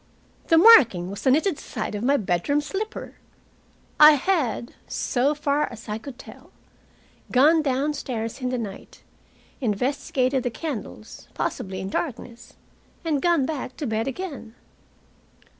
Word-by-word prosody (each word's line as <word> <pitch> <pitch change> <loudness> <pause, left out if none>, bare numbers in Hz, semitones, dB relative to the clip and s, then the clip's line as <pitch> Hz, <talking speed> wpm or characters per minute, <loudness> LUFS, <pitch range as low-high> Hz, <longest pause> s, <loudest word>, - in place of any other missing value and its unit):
The 330 - +5
marking 235 - +7
was 200 - -7
the 265 - +2
knitted 310 +5 +2
side 220 -4 -5
of 205 +1 -4
my 280 +3 +3
bedroom 195 +7 0
slipper. 405 +9 -5 0.8
I 300 0 +10
had, 285 - -1
so 275 +3 0
far 290 0 0
as 235 -1 -11
I 210 +1 -3
could 260 +1 -10
tell, - - -14 0.8
gone 305 +6 +5
downstairs, 265 -4 -2
in 250 - -1
the 255 - -2
night, 210 -5 -8 0.6
investigated 260 +2 0
the 245 - -2
candles, 235 -5 -7
possibly 190 -1 -3
in 190 +1 -5
darkness, 240 -5 -5 0.5
and 300 -4 0
gone 340 -6 +2
back 265 -3 -5
to 295 - -4
bed 225 -1 -1
again. 270 -7 -6
265 Hz, 135 wpm, -24 LUFS, 225-300 Hz, 0.8 s, I